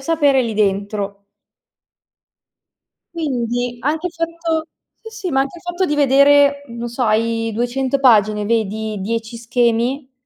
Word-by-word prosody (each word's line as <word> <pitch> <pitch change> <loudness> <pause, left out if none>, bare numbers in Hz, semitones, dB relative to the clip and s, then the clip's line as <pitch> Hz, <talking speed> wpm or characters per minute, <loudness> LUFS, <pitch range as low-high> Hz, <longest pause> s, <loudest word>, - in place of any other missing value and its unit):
sapere 285 -2 +2
è - - +2
lì 225 -2 -3
dentro. 200 0 -2 1.9
Quindi, 245 -5 -2
anche 310 +6 -1
il - - -15
fatto 330 -1 -2 0.3
sì, 450 - -10 0.2
sì, - - -3
ma 270 -1 +2
anche 275 +6 -3
il - - -20
fatto 350 +1 -2
di 295 - 0
vedere, 285 0 +4
non 235 0 -6
so, 240 +2 -4
hai 225 0 +1
200 255 +3 -1
pagine, 215 -5 +4
vedi 220 -1 -1
10 225 +3 -3
schemi, 240 +3 0
245 Hz, 140 wpm, -19 LUFS, 225-285 Hz, 1.9 s, vedere